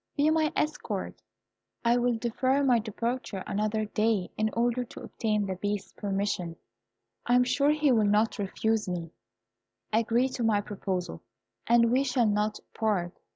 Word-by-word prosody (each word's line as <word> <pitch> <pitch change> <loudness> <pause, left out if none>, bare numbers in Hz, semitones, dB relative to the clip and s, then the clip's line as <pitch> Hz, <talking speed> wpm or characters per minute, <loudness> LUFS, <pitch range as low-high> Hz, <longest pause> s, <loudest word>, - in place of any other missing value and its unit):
Be 295 +2 +4
my 315 -1 +2
escort. 305 +1 -2 0.6
I 235 +1 +5
will 245 -1 +1
defer 255 +4 +1
my 250 -4 +4
departure 225 -2 -3
another 215 +1 -1
day, 215 -2 0
in 215 0 +1
order 240 +1 +1
to 240 - -11
obtain 210 -2 -1
the 190 -1 -3
Beast's 205 +1 -3
permission. 195 -4 -2 0.7
I 245 - +4
am 250 - +6
sure 280 +3 +2
he 300 -2 +3
will 220 -3 +4
not 210 +2 +2
refuse 215 +1 0
me. 170 -2 -4 0.8
Agree 230 +3 +3
to 255 - -5
my 220 -2 +3
proposal, 195 -3 -4 0.5
and 235 0 +5
we 260 +2 +3
shall 250 -3 +2
not 210 0 0
part. 195 -6 0
225 Hz, 155 wpm, -28 LUFS, 205-245 Hz, 0.8 s, am